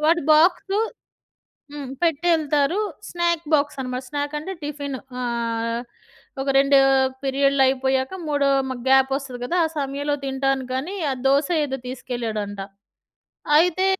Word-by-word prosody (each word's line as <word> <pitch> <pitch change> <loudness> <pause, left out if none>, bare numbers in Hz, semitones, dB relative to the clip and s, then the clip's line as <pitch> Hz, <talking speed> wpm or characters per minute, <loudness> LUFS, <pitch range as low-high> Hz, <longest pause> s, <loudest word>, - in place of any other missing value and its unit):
వాడి 340 +1 +3
బాక్సు 380 +5 +3 0.9
హ్మ్. 285 -3 -6
పెట్టెళ్తారు 320 0 +2 0.3
snack 340 -1 0
box 290 -1 +2
అనమాట. 255 0 -4
స్నాక్ 290 +1 -3
అంటే 375 +6 -6
టిఫిను. 285 -2 -4 0.2
ఆహ్, 230 -1 -2 0.6
ఒక 275 - -3
2 275 0 +5 0.4
పీరియడ్లయిపోయాక 270 0 +2 0.2
మూడో 285 -1 +2 0.2
మ - - -1 0.2
గ్యాపొస్తది 265 -1 +2
గదా! 345 +8 -1
ఆ 320 - 0
సమయంలో 285 +1 -1
తింటానికనీ 270 +5 -1
ఆ - - 0
దోస 280 +2 +3 0.2
ఏదో 270 -2 -3
తీసుకెళ్ళాడంట. 225 -5 -4 1.0
అయితే 360 +3 +3
275 Hz, 110 wpm, -23 LUFS, 260-300 Hz, 1.0 s, 2